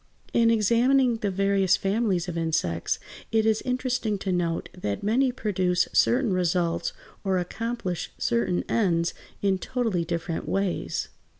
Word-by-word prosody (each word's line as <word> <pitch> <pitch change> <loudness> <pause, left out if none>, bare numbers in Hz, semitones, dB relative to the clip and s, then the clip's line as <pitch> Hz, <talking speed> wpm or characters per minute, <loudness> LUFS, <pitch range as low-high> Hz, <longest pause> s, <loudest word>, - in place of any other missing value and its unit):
] - - -38
In 230 -1 +4
examining 235 +3 +3
the 205 -2 -1
various 195 -1 +2
families 195 -3 0
of 175 - -4
insects 155 - 0 0.3
it 220 -1 +3
is 220 -1 +2
interesting 250 -4 -1
to 195 0 -3
note 170 -2 -1
that 105 - -4
many 250 +5 +2
produce 185 -6 0
certain 240 -4 +3
results 180 - 0 0.3
or 190 -2 +1
accomplish 190 0 -3
certain 120 +10 0
ends 170 -6 +1 0.3
in 195 -2 +2
totally 225 -9 -1
different 170 0 -3
ways. 195 -2 -1
195 Hz, 135 wpm, -26 LUFS, 175-230 Hz, 0.3 s, In